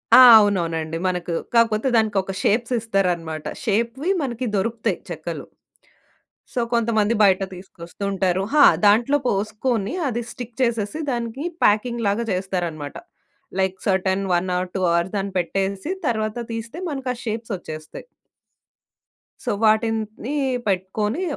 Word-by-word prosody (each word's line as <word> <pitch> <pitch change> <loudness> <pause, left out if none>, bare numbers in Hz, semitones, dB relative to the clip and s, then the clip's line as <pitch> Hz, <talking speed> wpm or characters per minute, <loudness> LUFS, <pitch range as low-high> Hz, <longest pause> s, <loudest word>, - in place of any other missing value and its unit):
ఆ! - - +10 0.2
అవునవునండి. 165 -6 0
మనకు 180 -1 -2 0.2
కాకపోతే 225 0 +3
దానికొక 205 -4 +1
షేప్స్ 230 +3 +1
ఇస్తారన్నమాట. 175 -8 -1 0.2
షేప్‌వి 235 - 0
మనకి 255 -2 -3
దొరుకుతాయి 225 +3 -1
చెక్కలు. - - -5 1.1
సో, 255 - -1
కొంతమంది 230 -1 +2
బయట 195 -1 +4
తీసుకొస్తూంటారు. 190 +1 -3
హా! 295 -2 +7 0.2
దాంట్లో 235 +8 +4
పోసుకొని 215 +2 -1 0.2
అది 240 0 -2
స్టిక్ 245 -2 -8
చేసేసి 230 +4 -1
దానికి 240 +5 -3 0.2
ప్యాకింగ్‌ 235 +3 +2
లాగా 210 +4 0
జేస్తారన్నమాట. 175 -6 -3 0.6
లైక్ 190 0 0
సెర్టైన్ 190 0 +1
1 180 +1 0
ఆర్ 180 0 -2
2 - - 0
అవర్స్ 170 +3 0
దాన్ని 195 0 -3
పెట్టేసి 195 - -2 0.2
తరువాత 215 -1 -1 0.2
తీస్తే 225 +6 -6
మనకా 270 -3 -3
షేప్సొచ్చేస్తాయి. 205 - -6 1.4
సో, - - -2
వాటిని 220 +3 +1 0.3
పెట్టుకొని 210 - -1
210 Hz, 110 wpm, -22 LUFS, 190-230 Hz, 1.4 s, ఆ